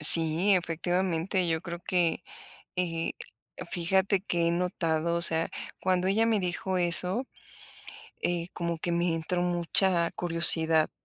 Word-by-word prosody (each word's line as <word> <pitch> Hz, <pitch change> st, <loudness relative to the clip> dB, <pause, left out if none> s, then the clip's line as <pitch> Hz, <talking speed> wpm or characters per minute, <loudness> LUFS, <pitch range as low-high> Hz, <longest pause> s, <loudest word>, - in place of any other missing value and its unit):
Sí, 165 Hz, +5 st, +5 dB
efectivamente, 175 Hz, +1 st, -2 dB
yo 160 Hz, -1 st, -2 dB
creo 170 Hz, -1 st, -8 dB
que, 175 Hz, -1 st, -2 dB, 0.5 s
eh, 165 Hz, -2 st, -3 dB, 0.6 s
fíjate 190 Hz, +3 st, -1 dB
que 170 Hz, -4 st, -2 dB
he -, -, 0 dB
notado, 170 Hz, -2 st, -2 dB
o 170 Hz, -, -2 dB
sea, 165 Hz, -1 st, +8 dB, 0.3 s
cuando 185 Hz, 0 st, -1 dB
ella 220 Hz, +4 st, +1 dB
me 225 Hz, -2 st, 0 dB
dijo 185 Hz, +1 st, -4 dB
eso, 180 Hz, +7 st, +2 dB, 1.0 s
eh, 175 Hz, 0 st, -3 dB
como 170 Hz, -1 st, -5 dB
que 170 Hz, +1 st, -4 dB
me 170 Hz, -1 st, -1 dB
entró 175 Hz, +2 st, -3 dB
mucha 175 Hz, 0 st, +2 dB
curiosidad, 165 Hz, -2 st, +3 dB
175 Hz, 130 wpm, -26 LUFS, 165-185 Hz, 1.0 s, sea